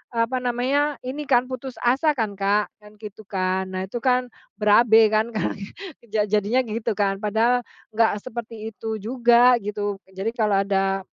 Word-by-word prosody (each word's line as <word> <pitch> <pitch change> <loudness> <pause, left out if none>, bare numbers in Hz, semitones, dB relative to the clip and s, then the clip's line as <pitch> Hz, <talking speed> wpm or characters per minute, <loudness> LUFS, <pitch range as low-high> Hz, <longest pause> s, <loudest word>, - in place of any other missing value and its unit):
apa 230 +3 0
namanya, 260 +4 0
ini 275 +3 -5
kan, 250 -2 +4
putus 255 0 -7
asa 275 +5 +2
kan, 215 -5 -3
Kak, 205 +1 +1
kan 210 0 -17
gitu 210 0 -10
kan. 190 -1 -1
Nah 185 0 -4
itu 195 +6 -5
kan, 250 0 +1 0.2
berabe 220 +1 +5
kan, 215 +1 +2
kalau 215 - 0
gi 195 - -7 0.4
ja 215 -1 0
jadinya 210 +5 +1
gitu, 225 -1 -3
kan. 195 -1 0
Padahal 220 +4 +2 0.3
enggak 220 -2 +1
seperti 225 -2 -7
itu 220 +1 -5
juga, 240 +2 +4
gitu. 205 -1 -4
Jadi 190 +3 -4
kalau 210 -4 +1
ada 195 -1 0
220 Hz, 165 wpm, -23 LUFS, 205-245 Hz, 0.4 s, berabe